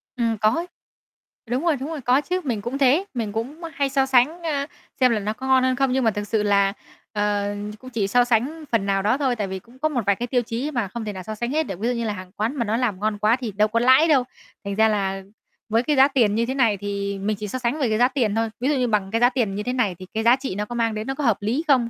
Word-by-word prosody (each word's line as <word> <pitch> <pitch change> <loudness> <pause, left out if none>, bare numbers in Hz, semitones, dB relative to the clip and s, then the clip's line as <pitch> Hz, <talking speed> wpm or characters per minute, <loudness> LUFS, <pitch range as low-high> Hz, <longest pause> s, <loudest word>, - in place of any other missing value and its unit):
Ừm, 230 -2 0
có 215 +1 +3
ấy. 340 +2 -3 0.8
Đúng 250 +5 -1
rồi, 330 - +3
đúng 280 +4 -5
rồi, 310 -4 -5
có 250 +3 +3
chứ, 365 +4 -2
mình 235 -7 -2
cũng 240 +6 -4
thế, 280 +7 +3
mình 225 -5 -3
cũng, 260 +10 -5
ơ, 335 - -4
hay 275 -1 0
so 270 0 +2
sánh, 270 +7 +2
ơ, 285 -3 -1 0.3
xem 255 -2 +5
là 225 - +1
nó 210 +1 -2
có 260 +4 -7
ngon 260 -1 +4
hơn 260 0 +2
không. 270 0 +1
Nhưng 260 0 +1
mà 225 - +3
thực 205 0 -5
sự 210 0 0
là, 200 -1 +3 0.4
ờ, 205 -1 0 0.2
ch 215 - -23
cũng 255 - -11
chỉ 220 -5 -1
so 245 +4 +4
sánh 250 +7 0
phần 225 -4 +1
nào 195 -1 +1
đó 215 +6 +2
thôi, 265 -4 0
tại 210 -3 -2
vì 190 0 -5
cũng 240 +6 -20
có 310 - +1
một 255 -6 -1
vài 200 -1 +3
cái 240 - -4
tiêu 245 0 +1
chí 240 +5 -4
mà 235 -8 -1
không 225 +3 -6
thể 210 - -4
nào 185 -1 -7
so 215 - -6
sánh 240 +4 -3
hết 315 +2 +1
được. 195 - -7
Ví 230 - -1
dụ 250 - +1
như 235 -1 -2
là 215 - -1
hàng 185 -2 -9
quán 225 +7 -1
mà 235 -5 -1
nó 220 +2 0
làm 230 -7 -1
ngon 210 0 -1
quá 215 +2 +3
thì 245 -4 -5
đâu 210 +2 +2
có 230 +2 0
lãi 260 +6 +5
đâu. 275 -5 +4 0.4
Thành 200 - -3
ra 220 +1 +4
là 195 -2 -1 0.5
với 225 +2 +2
cái 295 +2 +1
giá 270 +1 +7
tiền 230 -7 +2
như 230 +1 +1
thế 260 - -2
này 235 -7 +2
thì 200 0 -3
mình 210 +1 -1
chỉ 210 +1 -5
so 255 - -4
sánh 250 +5 -1
về 260 - +1
cái 215 - +1
giá 245 +1 +5
tiền 240 -6 0
thôi. 225 0 0
Ví 260 +4 0
dụ 295 - +2
như 250 -2 +1
bằng 205 -4 0
cái 230 +1 0
giá 245 - +6
tiền 235 -7 -1
như 210 - -3
thế 250 - -2
này 210 -8 0
thì 185 - -8
cái 220 0 -1
giá 240 +2 +6
trị 265 -8 -5
nó 205 +1 -2
có 240 +3 -7
mang 230 -1 +1
đến 215 +3 -4
nó 270 - -2
có 290 - -4
hợp 230 -5 +3
lý 235 +10 -1
không? 255 -5 +3
235 Hz, 320 wpm, -23 LUFS, 210-265 Hz, 0.8 s, giá